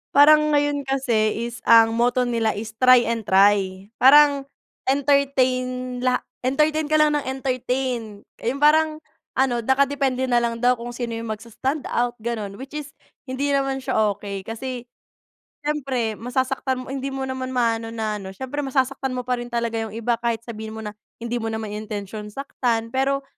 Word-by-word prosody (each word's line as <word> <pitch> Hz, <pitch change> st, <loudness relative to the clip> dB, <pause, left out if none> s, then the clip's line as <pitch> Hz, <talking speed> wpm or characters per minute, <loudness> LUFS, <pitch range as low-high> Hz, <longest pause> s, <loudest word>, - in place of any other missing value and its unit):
Parang 300 Hz, +1 st, +6 dB
ngayon 290 Hz, -1 st, 0 dB
kasi 235 Hz, -5 st, +1 dB
is 235 Hz, -1 st, -6 dB
ang 225 Hz, 0 st, +7 dB
motto 245 Hz, +2 st, +2 dB
nila 230 Hz, -2 st, 0 dB
is 220 Hz, +2 st, -5 dB
"try 255 Hz, -1 st, +7 dB
and 230 Hz, -2 st, -2 dB
try" 190 Hz, -1 st, +3 dB, 0.2 s
parang 280 Hz, +1 st, +6 dB, 0.4 s
entertain 255 Hz, -2 st, +1 dB
la 250 Hz, 0 st, +1 dB, 0.2 s
entertain 300 Hz, +4 st, +1 dB
ka 310 Hz, -, +1 dB
lang 300 Hz, -1 st, +4 dB
ng -, -, -8 dB
entertain, 255 Hz, -4 st, -2 dB, 0.2 s
yung 270 Hz, +5 st, -2 dB
parang 310 Hz, +1 st, +4 dB, 0.3 s
ano 260 Hz, -2 st, +2 dB
nakadepende 265 Hz, +1 st, +1 dB
nalang 240 Hz, -2 st, 0 dB
daw 250 Hz, -1 st, +3 dB
kung 240 Hz, +1 st, -7 dB
sino 235 Hz, -2 st, -4 dB
yung 230 Hz, -, -6 dB
mags 210 Hz, -, -15 dB
standout 250 Hz, -1 st, -1 dB
gano'n 215 Hz, -4 st, -3 dB
which 265 Hz, +5 st, -10 dB
is 300 Hz, -1 st, -7 dB, 0.3 s
hindi 270 Hz, +2 st, -1 dB
naman 270 Hz, -1 st, 0 dB
siya 215 Hz, -4 st, +1 dB
okey 200 Hz, -1 st, -7 dB
kasi, 245 Hz, +2 st, -5 dB, 0.8 s
siyempre 265 Hz, -7 st, -2 dB
masasaktan 260 Hz, +1 st, -1 dB
mo 260 Hz, -, -8 dB
hindi 270 Hz, 0 st, -3 dB
mo 270 Hz, -1 st, -4 dB
naman 260 Hz, -1 st, -4 dB
maano 230 Hz, -3 st, 0 dB
na 220 Hz, -2 st, -3 dB
ano 190 Hz, -, -8 dB
siyempre 265 Hz, +6 st, -4 dB
masasaktan 265 Hz, -1 st, -1 dB
mo 250 Hz, -, -3 dB
pa 250 Hz, 0 st, -1 dB
rin 240 Hz, -, -6 dB
talaga 235 Hz, -1 st, -2 dB
yung 220 Hz, -1 st, -5 dB
iba 230 Hz, 0 st, -1 dB
kahit 235 Hz, -1 st, -1 dB
sabihin 220 Hz, -2 st, -7 dB
mo 220 Hz, -, -7 dB
na, 210 Hz, -, -5 dB, 0.2 s
hindi 235 Hz, +1 st, -3 dB
mo 225 Hz, -, -3 dB
na 220 Hz, -, -3 dB
naman 220 Hz, -2 st, -5 dB
intensyon 210 Hz, 0 st, -6 dB
saktan 230 Hz, -1 st, -2 dB
pero 275 Hz, +1 st, 0 dB
250 Hz, 170 wpm, -23 LUFS, 225-270 Hz, 0.8 s, ang